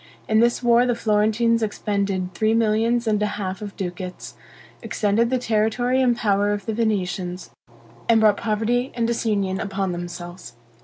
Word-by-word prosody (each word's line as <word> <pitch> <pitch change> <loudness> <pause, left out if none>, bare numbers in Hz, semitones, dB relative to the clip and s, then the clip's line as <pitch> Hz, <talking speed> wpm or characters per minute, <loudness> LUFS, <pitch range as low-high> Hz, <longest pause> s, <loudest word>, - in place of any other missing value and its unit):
In 220 0 +3
this 240 +2 +2
war 240 +1 +4
the 245 - +1
Florentines 220 +2 +2
expended 200 -3 -2
three 220 +1 +1
millions 230 +2 +2
and 210 -2 +1
a 210 - +2
half 190 -1 -4
of 205 -2 -7
ducats, 180 -9 -6 0.5
extended 215 +3 +1
the 260 - +1
territory 245 +2 +1
and 245 -2 +2
power 205 -2 +1
of 205 -2 -5
the 220 - -2
Venetians, 185 -5 -2 0.6
and 230 -1 +6
brought 210 -2 +4
poverty 230 +3 0
and 235 -1 0
disunion 205 -5 0
upon 195 -2 -2
themselves. 175 -5 -7
215 Hz, 155 wpm, -22 LUFS, 195-230 Hz, 0.6 s, and